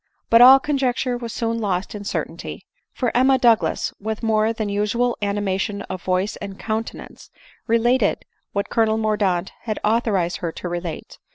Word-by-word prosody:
But 230 +1 +7
all 260 +2 +10
conjecture 265 -3 0
was 235 -1 -5
soon 230 0 -2
lost 195 -4 -2
in 205 -1 -6
cer - - -1
tainty; - - -9 0.3
for 245 -3 -2
Emma 260 +2 +4
Douglas, 235 -3 +2
with 220 +2 -4
more 220 0 +2
than 220 -2 -3
usual 210 +4 0
anima 200 -2 -1
tion 200 0 -3
of 185 - -6
voice 185 +3 -1
and 200 -2 -7
countenance, 220 +1 -5 0.4
related 230 0 +2 0.3
what 200 0 -3
Colonel 220 -1 +2
Mordaunt 205 -4 0
had 215 -2 -2
authorized 210 -6 +1
her 170 -2 -3
to - - -6
relate 175 -2 -6
215 Hz, 165 wpm, -22 LUFS, 200-235 Hz, 0.4 s, all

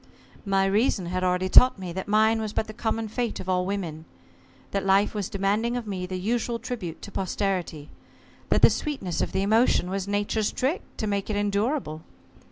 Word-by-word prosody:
"My 195 0 +3
reason 200 -1 +1
had 185 +1 -2
already 180 0 +1
taught 250 +6 +7
me 185 -3 -6
that 190 +1 -5
mine 220 +2 +3
was 215 -1 -4
but - - 0
the 215 - -9
common 225 0 -2
fate 235 +1 -3
of 185 - -7
all 180 -1 +1
women: 170 -6 -4 0.7
that 195 -1 -1
life 195 +1 +3
was 205 -3 -3
demanding 210 +5 0
of 240 - -4
me 185 -3 -4
the 185 0 -4
usual 235 +4 -1
tribute 225 -9 -6
to 205 - -8
posterity: 185 -6 -2 0.6
that - - +2
the - - +8
sweetness 205 - -3
of - - -1
the 190 - 0
emotion 215 -3 +3
was 195 0 -2
Nature's 205 +1 0
trick 290 - -1 0.2
to 220 - -2
make 200 -1 -2
it 215 - -1
endurable. 205 - -1
200 Hz, 190 wpm, -26 LUFS, 185-220 Hz, 0.7 s, the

